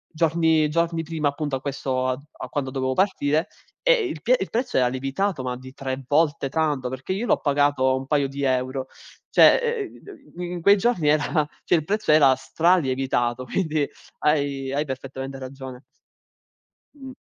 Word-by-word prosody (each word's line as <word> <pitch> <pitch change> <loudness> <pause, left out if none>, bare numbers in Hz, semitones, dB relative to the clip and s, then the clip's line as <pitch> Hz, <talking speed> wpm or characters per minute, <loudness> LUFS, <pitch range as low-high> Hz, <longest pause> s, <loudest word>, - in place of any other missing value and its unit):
giorni 160 -1 +2
giorni 165 +1 0
prima, 160 -2 -1
appunto, 145 -1 -3
a 130 - -5
questo 130 -2 -2
a 130 - -1 0.2
a - - -6
quando 140 -3 -2
dovevo 130 0 -1
partire, 165 -2 +1 0.3
e - - +5
il 155 - -5
pie 250 +7 +4
il 190 - -3
prezzo 240 +3 -1
era 125 - +4
lievitato 135 +7 -2
ma 125 -1 -3
di 130 +1 -12
3 135 0 -5
volte 145 -2 +1
tanto, 145 -3 0
perché 130 +8 -4
io 205 +5 -2
l'ho - - +2
pagato 145 -2 +2
1 130 - -6
paio 140 0 +1
di 140 +1 -5
euro. 130 0 -1 0.4
Cioè, 465 -4 +4 0.2
uhm, 345 -8 -14
mhmm, 175 0 -5
in 175 -1 -5
quei 200 +4 +6
giorni 210 -7 +1
era 150 0 +1 0.2
cioè, - - 0
il 160 - +1
prezzo 210 +2 0
era 140 -4 +6
stralievitato, 130 -5 +1
quindi, 155 0 -1 0.3
hai 140 -3 0
hai 145 +2 -1
perfettamente 135 0 -6
ragione. 130 -1 -9 1.1
Mh. 265 -2 -10
145 Hz, 170 wpm, -24 LUFS, 130-170 Hz, 1.1 s, quei